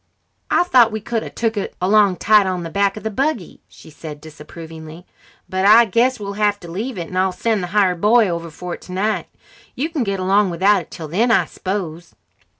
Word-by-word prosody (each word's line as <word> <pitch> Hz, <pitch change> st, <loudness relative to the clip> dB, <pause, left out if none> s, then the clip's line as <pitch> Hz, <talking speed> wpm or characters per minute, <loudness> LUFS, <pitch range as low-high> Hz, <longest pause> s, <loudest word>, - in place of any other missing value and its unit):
"I -, -, +3 dB
thought 250 Hz, -10 st, +4 dB
we 220 Hz, -, -3 dB
could 230 Hz, +1 st, -3 dB
a -, -, -7 dB
took 225 Hz, -1 st, -2 dB
it 200 Hz, -, -4 dB
along 200 Hz, +1 st, +3 dB
tied 210 Hz, +1 st, +4 dB
on 180 Hz, -2 st, -2 dB
the 165 Hz, -, -7 dB
back 200 Hz, +2 st, +1 dB
of -, -, -8 dB
the 220 Hz, -, -3 dB
buggy," 265 Hz, -, -2 dB
she -, -, -16 dB
said 150 Hz, 0 st, -9 dB
disapprovingly, 160 Hz, +2 st, -11 dB, 0.4 s
"but 190 Hz, 0 st, -2 dB
I 220 Hz, +4 st, +7 dB
guess 240 Hz, +5 st, +1 dB
we'll 200 Hz, -1 st, -5 dB
have 205 Hz, 0 st, 0 dB
to 175 Hz, -, -10 dB
leave 220 Hz, +6 st, -4 dB
it, 170 Hz, -2 st, -5 dB
and 185 Hz, -, -5 dB
I'll 190 Hz, 0 st, +2 dB
send 215 Hz, +2 st, -1 dB
the 180 Hz, -, -3 dB
hired 185 Hz, -2 st, +1 dB
boy 225 Hz, +1 st, +4 dB
over 170 Hz, -1 st, -4 dB
for 175 Hz, +3 st, -7 dB
it -, -, -9 dB
tonight. 195 Hz, +4 st, -2 dB, 0.5 s
You 300 Hz, +5 st, -2 dB
can 300 Hz, -6 st, -1 dB
get 200 Hz, -3 st, -2 dB
along 195 Hz, +2 st, +2 dB
without 190 Hz, +3 st, +2 dB
it -, -, -15 dB
till 160 Hz, -3 st, -8 dB
then, 210 Hz, +10 st, +1 dB
I 195 Hz, -7 st, +3 dB
s'pose?" 175 Hz, -2 st, -5 dB
195 Hz, 220 wpm, -19 LUFS, 175-220 Hz, 0.5 s, I